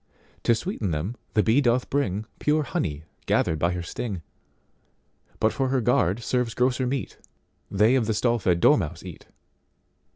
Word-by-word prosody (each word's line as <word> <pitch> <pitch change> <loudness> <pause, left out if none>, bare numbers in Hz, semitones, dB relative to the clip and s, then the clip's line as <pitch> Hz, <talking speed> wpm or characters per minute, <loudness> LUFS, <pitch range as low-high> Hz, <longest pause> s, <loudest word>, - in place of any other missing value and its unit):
To 115 - +5
sweeten 115 - -3
them 85 +9 -2 0.2
the 105 - +4
bee 115 +6 +3
doth 125 -1 +2
bringPure 140 +5 0
honey 75 - -3 0.2
gathered 80 - +1
by 85 +3 +1
her 90 -1 -4
sting:But 100 - -7
for 135 - 0
her 130 0 +1
guard 115 -3 +1
serves 125 -1 -1
grosser 125 +1 +1
meat—They 120 -4 -2
of 125 -5 +2
the 110 - 0
stall 120 +1 +1
fed 90 -4 +1
dormouse - - +3
eat. - - -10
115 Hz, 140 wpm, -25 LUFS, 95-125 Hz, 0.2 s, To